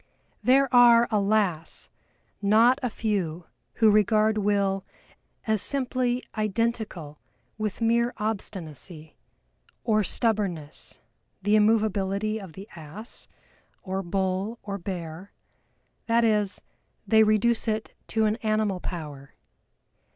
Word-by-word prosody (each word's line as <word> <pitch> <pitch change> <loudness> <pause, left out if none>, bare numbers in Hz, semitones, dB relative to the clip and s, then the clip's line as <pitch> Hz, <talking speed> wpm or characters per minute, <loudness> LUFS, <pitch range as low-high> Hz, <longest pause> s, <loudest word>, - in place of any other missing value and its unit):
There 270 +4 +5
are, 240 -1 +7
alas! 200 -5 0 0.5
not 225 +6 +4
a 250 - -1
few 185 -7 -2 0.3
who 220 -2 +5
regard 215 +1 +3
Will 200 -1 +1 0.6
as 220 -3 +1
simply 255 -2 0
identical 215 -8 -2 0.4
with 215 +1 -3
mere 235 +1 +2
obstinacy, 175 -7 -5 0.7
or 215 -2 +2
stubbornness, 195 -9 -1 0.5
the 205 +2 +3
immovability 215 -1 +1
of 185 -5 -10
the 195 +4 -10
Ass, 170 +8 -9 0.6
or 190 0 -3
Bull, 190 +4 -2
or 200 -1 -5
Bear 175 0 -6 0.8
that 230 0 +3
is, 210 -3 +1 0.4
they 220 -1 +5
reduce 220 +2 +2
it 220 0 -2
to 220 -1 +1
an 215 +1 +1
animal 215 -4 0
power. 150 -6 -7
210 Hz, 105 wpm, -26 LUFS, 190-225 Hz, 0.8 s, are